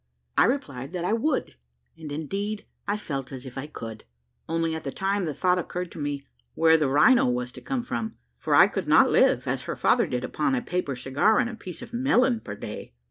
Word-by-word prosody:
I - - +6
replied 140 - -2
that 175 -1 -2
I 210 - +1
would; 265 +5 -1 0.4
and, 155 -2 -9
indeed, 200 +8 -3 0.2
I 205 +1 0
felt 135 -10 -5
as 130 -1 -8
if 130 - -9
I 135 +2 -5
could, 115 -7 -8 0.5
only 165 0 0
at 160 - -5
the 135 - -3
time 195 +2 -1
the 155 - -2
thought 180 +3 +2
occurred 180 0 -4
to - - -9
me 145 -1 -3 0.3
where 160 0 +5
the 150 -4 +2
rhino 150 - +5
was 125 0 -1
to - - -11
come 265 -3 -2
from, 115 - -3 0.3
for - - +1
I - - +9
could - - -3
not - - +6
live, - - +4
as - - -2
her - - -3
father - - +3
did, 125 0 -2
upon 205 - 0
a 250 - 0
paper 180 - -2
cigar 135 - +2
and 240 -1 +1
a - - -7
piece 185 -1 -8
of 240 0 -12
melon 250 -1 +3
per 100 - -7
day. 80 - -8
165 Hz, 225 wpm, -26 LUFS, 135-215 Hz, 0.5 s, I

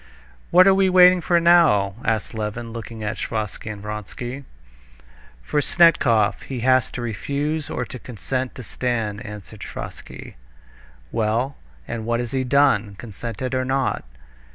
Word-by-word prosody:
"What 180 +1 +7
are 195 - +6
we 190 0 +3
waiting 180 0 +7
for 170 +1 +3
now?" 165 - +4
asked 110 -2 -1
Levin, 110 +1 -4
looking 115 -1 -7
at 105 0 -3
Sviazhsky 110 0 -4
and 100 -1 -9
Vronsky. 120 +6 -6 1.0
"For 150 - 0
Snetkov. 140 - +3
He 130 -3 -6
has 130 0 +3
to 120 - -4
refuse 140 - -2
or 125 - -3
to 125 - -9
consent 125 +2 -4
to 125 - -8
stand," 110 -3 -2
answered 105 -3 -10
Sviazhsky. - - -9 0.7
"Well, 115 +5 0 0.3
and 115 -1 -4
what 120 0 +1
has 120 -1 -3
he 130 -1 0
done, 125 -6 +2
consented 120 +4 -6
or 130 0 +1
not?" 135 0 -1
120 Hz, 145 wpm, -22 LUFS, 110-140 Hz, 1.0 s, What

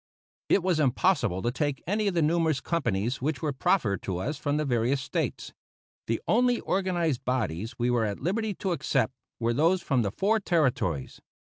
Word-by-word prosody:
It 195 - +3
was 180 -4 +1
impossible 130 - +2
to 120 - +1
take 145 0 -2
any 210 +4 0
of 195 - 0
the 165 - +3
numerous 160 -2 +2
companies 125 - -1
which 145 +1 -2
were 150 -2 0
proffered 130 - +1
to 95 -2 -3
us 135 +12 -2
from 145 0 0
the 150 - 0
various 125 +1 +1
States. 130 - -3 0.5
The 115 - 0
only 245 +2 +3
organized 175 -8 0
bodies 115 -3 -2
we 120 +1 +1
were 120 -2 +2
at 100 -1 -3
liberty 210 +3 -1
to 190 - -2
accept 140 -5 0 0.3
were 115 0 +1
those 170 +7 +2
from 130 -4 +1
the 100 - 0
four 210 - +1
Territories. 130 - 0
145 Hz, 185 wpm, -27 LUFS, 120-175 Hz, 0.5 s, It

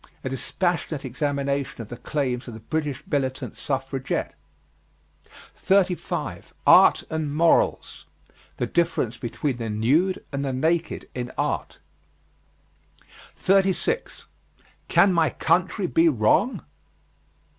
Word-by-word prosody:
A 130 - -2
dispassionate 160 +1 -2
examination 140 +1 -2
of 115 -2 -7
the 120 - -7
claims 130 -1 -2
of 120 - -7
the - - -9
British 150 +3 -3
militant 130 -2 -2
suffragette. 135 -1 -3 1.2
35. 190 -2 -1
ART - - +7
AND 155 -2 -2
MORALS. 165 +2 +2 0.5
The - - 0
difference 165 -9 0
between 120 +3 -3
the 115 -2 -4
nude 140 - +1
and 140 0 -2
the 135 -2 -2
naked 160 +5 -1
in 125 -1 -4
art. - - -2 1.6
36. 195 - +1 0.6
CAN 195 - +4
MY 165 -3 +3
COUNTRY 180 +4 +1
BE 165 -1 +4
WRONG? 150 - +2
145 Hz, 105 wpm, -24 LUFS, 130-170 Hz, 1.6 s, ART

